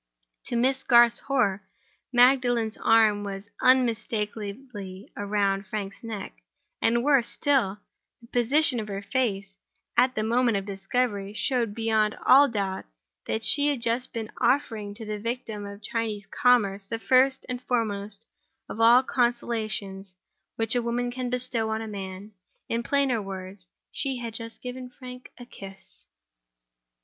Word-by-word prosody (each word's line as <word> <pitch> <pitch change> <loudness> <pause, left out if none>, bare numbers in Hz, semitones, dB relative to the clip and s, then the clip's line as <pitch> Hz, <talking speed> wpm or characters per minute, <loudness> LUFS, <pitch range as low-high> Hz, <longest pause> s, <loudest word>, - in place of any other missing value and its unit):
To - - -2
Miss 260 +3 +2
Garth's 235 -1 +6
horror, 230 -8 0 0.5
Magdalen's 245 -3 +4
arm 220 -2 +4
was 200 0 -7
unmistakably 220 -4 0
round 200 -1 0
Frank's 200 +1 -5
neck; 220 -4 -6 0.5
and, 235 +1 +2
worse 275 -4 +4
still, 255 -9 +1 0.4
the 235 - -17
position 255 +2 +2
of 215 - -5
her 200 0 -5
face, 200 -5 -2 0.4
at 255 +2 +3
the 215 - 0
moment 235 -1 +2
of 195 - -4
discovery, 205 0 -2
showed 235 -4 0
beyond 220 -2 +1
all 280 +2 +7
doubt 195 -4 -3 0.4
that 220 0 -2
she 290 0 +4
had 285 -3 0
just 235 +2 0
been 225 -2 -5
offering 225 -6 0
to 225 0 -8
the 210 0 -4
victim 225 -2 -4
of 200 +1 -10
Chinese 220 -2 -3
commerce 200 -3 +2
the 230 - -3
first 260 +3 +3
and 250 -1 -4
foremost 215 -4 -2 0.4
of 220 - -7
all 240 +3 +7
the - - -27
consolations 215 -6 -1 0.4
which 225 -1 -1
a 245 - +2
woman 240 +1 -1
can 250 0 -4
bestow 245 -3 -1
on 220 0 -1
a - - -6
man. 195 0 -7 0.4
In 230 - -1
plainer 265 -2 +1
words, 190 -1 -8 0.2
she 270 -2 -2
had 235 -2 -5
just 230 0 -8
given 250 0 -6
Frank 250 0 -11
a 245 - -10
kiss. 195 -5 -12
225 Hz, 145 wpm, -26 LUFS, 205-250 Hz, 0.5 s, all